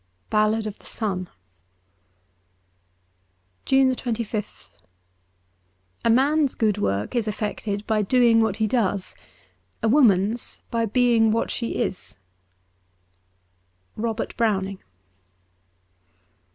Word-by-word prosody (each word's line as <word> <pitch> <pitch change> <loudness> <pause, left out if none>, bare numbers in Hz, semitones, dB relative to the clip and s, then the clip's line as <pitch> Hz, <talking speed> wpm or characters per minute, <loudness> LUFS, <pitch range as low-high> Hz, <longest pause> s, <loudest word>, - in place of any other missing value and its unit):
'Ballad 215 +1 +2
of 215 -1 -6
the - - -17
Sun.' 185 -5 -3 2.4
193 255 -3 +2
JUNE 215 0 -2
25th - - -23 1.4
A 230 - +2
MAN'S 280 +4 +3
good 210 -2 +1
work 100 - -1
is 230 -3 0
effected 210 -1 -3
by 220 -1 +1
doing 230 +1 +4
what 220 -3 0
he 220 - +1
does: 205 -4 -1 0.7
a - - +3
woman's 220 -3 +2
by 230 -1 0
being 235 -1 +3
what 225 +1 0
she 235 - -3
is, 195 - -3 0.8
' 90 0 -44
Robert 225 0 -3
Browning.' 195 -4 0
215 Hz, 100 wpm, -24 LUFS, 195-235 Hz, 2.4 s, doing